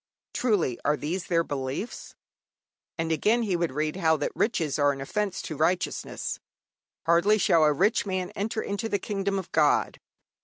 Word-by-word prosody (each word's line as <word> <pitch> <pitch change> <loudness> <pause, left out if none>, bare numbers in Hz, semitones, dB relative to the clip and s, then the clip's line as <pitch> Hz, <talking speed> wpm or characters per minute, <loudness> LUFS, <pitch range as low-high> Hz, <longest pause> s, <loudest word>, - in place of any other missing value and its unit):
Truly, 205 - +1
are 150 +1 +2
these 165 +7 -3
their 170 -1 +2
beliefs? 140 - -5 0.8
And, 165 -1 -1
again, 215 +9 +2
he 195 -5 0
would 170 -3 0
read 155 +4 -2
how 160 -3 +3
that 145 - -2
riches 160 - 0
are 145 0 +4
an 135 - -6
offence 195 +8 -2
to 155 - -5
righteousness: 170 +5 -1 0.7
hardly 170 +6 +4
shall 170 -5 +4
a 150 - +5
rich 195 +9 +2
man 185 -2 -3
enter 220 +2 -3
into 205 +3 -3
the 200 - +1
kingdom 200 -1 -2
of 185 -2 -5
God. 150 -2 +2
170 Hz, 165 wpm, -27 LUFS, 150-200 Hz, 0.8 s, a